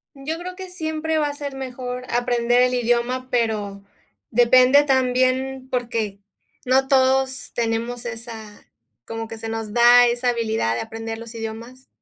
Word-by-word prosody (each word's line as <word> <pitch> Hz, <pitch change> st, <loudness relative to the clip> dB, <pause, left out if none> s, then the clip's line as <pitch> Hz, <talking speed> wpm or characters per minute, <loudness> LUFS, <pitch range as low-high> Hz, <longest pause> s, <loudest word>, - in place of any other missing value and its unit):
Yo 285 Hz, +4 st, -4 dB
creo 360 Hz, +2 st, -7 dB
que 375 Hz, -1 st, -8 dB
siempre 320 Hz, -2 st, -2 dB
va 295 Hz, -1 st, +1 dB
a -, -, -5 dB
ser 285 Hz, -1 st, -6 dB
mejor 250 Hz, -1 st, -5 dB
aprender 240 Hz, 0 st, +2 dB
el 250 Hz, 0 st, +3 dB
idioma, 245 Hz, +1 st, 0 dB
pero 215 Hz, -5 st, -1 dB, 0.5 s
depende 255 Hz, +4 st, +5 dB
también, 260 Hz, 0 st, +1 dB
porque 230 Hz, -5 st, -2 dB, 0.5 s
no 265 Hz, +1 st, +3 dB
todos 265 Hz, 0 st, +2 dB
tenemos 235 Hz, +1 st, -2 dB
esa 225 Hz, -2 st, -8 dB, 0.4 s
como 225 Hz, 0 st, -5 dB
que 225 Hz, -, -7 dB
se 225 Hz, 0 st, -6 dB
nos 225 Hz, -2 st, -5 dB
da 240 Hz, +1 st, +7 dB
esa 240 Hz, +1 st, 0 dB
habilidad 220 Hz, -, 0 dB
de -, -, -2 dB
aprender 225 Hz, 0 st, -6 dB
los 230 Hz, 0 st, -9 dB
idiomas. 230 Hz, +3 st, -8 dB
245 Hz, 150 wpm, -22 LUFS, 225-260 Hz, 0.5 s, da